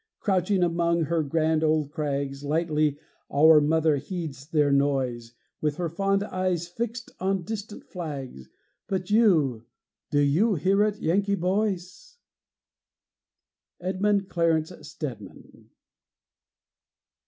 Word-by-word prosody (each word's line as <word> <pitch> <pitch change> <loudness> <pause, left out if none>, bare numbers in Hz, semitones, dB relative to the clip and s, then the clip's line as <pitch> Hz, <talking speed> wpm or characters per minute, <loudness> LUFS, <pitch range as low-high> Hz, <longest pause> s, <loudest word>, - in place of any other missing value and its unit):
Crouching 190 -1 +1
among 170 0 +1
her 165 +2 0
grand 155 +1 +1
old 155 -2 +1
crags, 140 -2 -3
Lightly 155 -1 0 0.3
our 155 +1 +6
mother 155 0 +2
heeds 145 -4 -6
their 150 -3 +2
noise, 130 -4 0 0.3
With 150 -1 0
her 170 +1 -2
fond 195 +4 0
eyes 185 -4 -2
fixed 235 +6 -5
on 190 0 0
distant 210 +2 -6
flags; 135 - -7 0.4
But 190 0 -3
you 155 - +3 0.4
do 145 - +1
you 165 +10 +3
hear 190 +6 +2
it, 210 0 +1
Yankee 200 +4 +1
boys? 195 - -2 1.6
EDMUND 195 +2 0
CLARENCE 165 -2 +1
STEDMAN. 115 - -9
165 Hz, 110 wpm, -26 LUFS, 145-190 Hz, 1.6 s, our